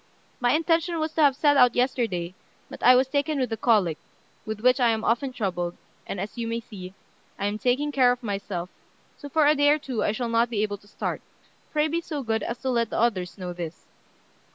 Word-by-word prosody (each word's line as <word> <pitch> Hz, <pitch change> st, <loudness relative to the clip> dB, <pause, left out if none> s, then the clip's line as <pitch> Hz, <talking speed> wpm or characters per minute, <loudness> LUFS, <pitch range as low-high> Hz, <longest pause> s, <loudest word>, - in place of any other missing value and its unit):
My 245 Hz, 0 st, +2 dB
intention 330 Hz, +2 st, +1 dB
was 315 Hz, 0 st, -1 dB
to 320 Hz, -, +1 dB
have 280 Hz, -3 st, +5 dB
set 290 Hz, 0 st, +3 dB
out 250 Hz, -2 st, +5 dB
yesterday; 225 Hz, -9 st, 0 dB, 0.4 s
but -, -, -9 dB
I 250 Hz, +1 st, +7 dB
was 255 Hz, +1 st, +3 dB
taken 285 Hz, +2 st, 0 dB
with 250 Hz, -3 st, -1 dB
a -, -, 0 dB
cholic, 200 Hz, -11 st, +2 dB, 0.5 s
with 215 Hz, -1 st, -4 dB
which 250 Hz, +2 st, +4 dB
I 240 Hz, -2 st, +4 dB
am 220 Hz, -1 st, 0 dB
often 245 Hz, +4 st, 0 dB
troubled, 175 Hz, -7 st, -3 dB, 0.3 s
and, 195 Hz, -, -4 dB
as 205 Hz, +5 st, -6 dB
you 230 Hz, -, -2 dB
may 230 Hz, 0 st, -2 dB
see, 195 Hz, -5 st, -10 dB, 0.4 s
I 200 Hz, -, -3 dB
am 205 Hz, +1 st, -2 dB
taking 265 Hz, +5 st, +1 dB
care 255 Hz, -3 st, +4 dB
of 245 Hz, 0 st, -3 dB
myself; 195 Hz, -4 st, -4 dB, 0.5 s
so 285 Hz, -, -10 dB
for 310 Hz, +1 st, +3 dB
a 295 Hz, -, +6 dB
day 290 Hz, -1 st, +3 dB
or 300 Hz, -, +5 dB
two 260 Hz, -7 st, -3 dB
I -, -, +1 dB
shall 235 Hz, +3 st, -3 dB
not 230 Hz, +1 st, +2 dB
be 215 Hz, -3 st, 0 dB
able 205 Hz, -2 st, -3 dB
to 205 Hz, -, -22 dB
start. -, -, -4 dB, 0.5 s
Pray 300 Hz, 0 st, +2 dB
be 335 Hz, +2 st, -1 dB
so 300 Hz, -4 st, -5 dB
good 225 Hz, -1 st, -1 dB
as 235 Hz, -, -4 dB
to 260 Hz, -, 0 dB
let 235 Hz, -2 st, +1 dB
the -, -, -3 dB
others 200 Hz, -6 st, 0 dB
know 180 Hz, -2 st, -5 dB
this." 170 Hz, -2 st, -7 dB
240 Hz, 230 wpm, -25 LUFS, 205-280 Hz, 0.5 s, I